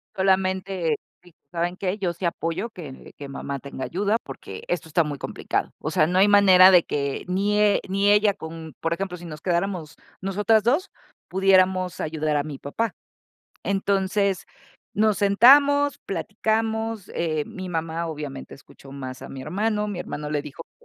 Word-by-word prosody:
solamente, 190 -3 +1 0.3
dije: 175 -2 -20
“¿Saben 175 +1 -2
qué? 190 +1 -2
Yo 180 -3 -1
sí 175 +2 -5
apoyo 170 +5 -2
que 155 - -10
que 140 - -7
mamá 140 0 -5
tenga 135 -1 -6
ayuda 205 +5 0
porque 115 -8 -9
esto 170 -2 -2
está 165 +2 +3
muy 145 -2 -4
complicado. - - -2
O 155 - -4
sea, 155 0 +3
no 180 +2 0
hay 200 - +6
manera 190 -2 +8
de 180 -2 +7
que 140 -1 -3
ni 200 +3 +1
e 210 -1 +4
ni 200 +1 +3
ella 205 -1 +4
con, 160 -3 -9
por 165 0 0
ejemplo, 180 0 -4
si 175 - -11
nos 155 -3 -8
quedáramos 175 -3 -2 0.3
nosotras 210 +3 +2
2, 290 - +1 0.4
pudiéramos 185 -1 +3
ayudar 155 -1 -1
a 145 - 0
mi 150 -3 -7
papá." 215 +9 -2 0.7
Entonces, 195 -1 0 0.5
nos 215 -1 +2
sentamos, 280 +8 +5
platicamos, 220 +1 -2
eh, 155 -3 -1
mi 185 -1 -7
mamá 165 0 -2
obviamente 145 -4 -7
escuchó 135 0 -15
más 130 -2 -7
a - - -8
mi 135 -1 -8
hermano, 210 +5 -1
mi 200 -4 -4
hermano 150 0 -5
le 145 -1 -1
dijo 150 +3 -9
que - - -81
185 Hz, 170 wpm, -24 LUFS, 155-200 Hz, 0.7 s, manera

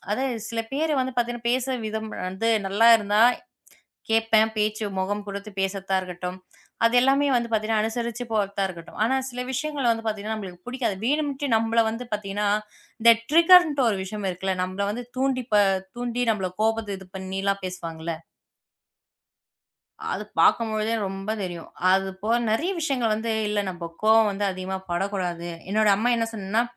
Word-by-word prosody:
அதாவது 260 +2 -1
சில 230 -1 -2
பேரு 310 +2 0
வந்து 260 0 -2
பார்த்தீங்க 240 0 0
என்றால், 235 - -9
பேசும் 255 -2 -1
விதம் 220 0 -4 0.2
வந்து 190 +5 -2 0.2
நன்றாக 225 +4 +6
இருந்தால் 215 +4 +4 0.7
கேட்பேன் 225 0 +3
பேச்சு, 215 0 0
முகம் 205 +2 -2
கொடுத்துப் 200 0 -7
பேசத்தான் 195 0 0
இருக்கட்டும், 180 0 -6 0.5
அது 230 - +3
எல்லாமே 275 +2 +3
வந்து 235 -1 0
பார்த்தீங்க 220 0 0
என்றால், 215 - +2
அனுசரிச்சு 235 +1 -4
போறதாக 200 -2 0
இருக்கட்டும். 170 0 -10
ஆனா 265 +3 +2
சில 250 0 -4
விஷயங்களை 275 0 -2
வந்து 225 0 -3
பார்த்தீங்க 215 -1 -3
என்றால் 220 0 -2
நம்மளுக்கு 180 +1 -10
பிடிக்காது. 245 -5 -1
வேண்டுமென்றே 285 0 0
நம்மளை 225 +1 +2
வந்து 230 +3 -5
பார்த்தீங்க 200 -1 -4
என்றால், 210 0 +1 0.4
இந்த 230 +1 +8 0.2
ட்ரிகர் 350 +2 +8
என்ற 285 -2 -1
ஒரு 205 - 0
விஷயம் 200 +1 -4
இருக்குல்லே. 190 +1 -2
நம்மளை 185 +2 -2
வந்து 240 +2 -5
தூண்டி 260 -1 +1
ப - - +6 0.4
தூண்டி 245 0 -1
நம்மளை 190 -4 -2
கோபத்தில் 205 -4 -2
பண்ணி 190 0 -4
எல்லாம் 200 0 0
பேசுவாங்க 170 -3 -6
இல்லை. 165 -1 -2 1.9
அத - - -2 0.2
பாக்கும் 230 -1 +4
பொழுதே 215 +1 0
ரொம்ப 195 +2 -6
தெரியும். 175 -2 -6 0.2
அது 195 0 +2
போல 225 +3 +2 0.2
நெறைய 320 - +1
விஷயங்கள் 255 -8 0
வந்து 225 +1 -2 0.2
இல்ல. 210 0 0
நம்ம 170 -2 -6 0.2
கோவம் 220 -1 +5
வந்து 200 +1 -2
அதிகமா 185 +1 -4
படக் 195 +4 -1
கூடாது. 175 -3 -3 0.2
என்னோட 215 +1 +2
அம்மா 225 +5 +1
என்ன 230 - +1
சொன்னான, 215 +2 0
215 Hz, 170 wpm, -25 LUFS, 195-240 Hz, 1.9 s, இந்த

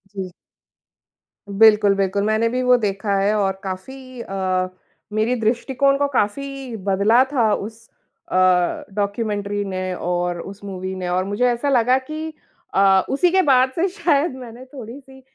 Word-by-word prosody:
जी। 185 -2 -5 1.2
बिल्कुल, 210 0 +5
बिल्कुल। 195 +1 0
मैंने 220 +2 +1
भी 255 +1 -1
वो 250 0 +5
देखा 200 -2 -1
है 200 +2 +2
और 195 -1 -1
काफ़ी 255 +7 -7
अ, 185 -2 -2 0.4
मेरी 220 +4 +1
दृष्टिकोण 260 +5 +1
को 285 0 +1
काफ़ी 270 +3 -2
बदला 205 +6 +4
था 225 -5 +3
उस 220 +2 -6 0.4
अ, - - -2 0.6
डॉक्यूमेंट्री 205 0 -2
ने 185 -1 -3
और 175 0 -2
उस 200 +1 -10
मूवी 190 -1 -5
ने। 180 -1 -4
और 185 +1 +1
मुझे 205 +5 0
ऐसा 240 +4 -1
लगा 250 0 +3
कि 310 +1 -4 0.5
अ, 195 -1 +4
उसी 340 +6 +2
के 380 - +4
बाद 260 -4 +3
से 355 +3 +1
शायद 335 -6 0
मैंने 245 0 -10
थोड़ी-सी 265 +1 -11
220 Hz, 150 wpm, -21 LUFS, 195-260 Hz, 1.2 s, बिल्कुल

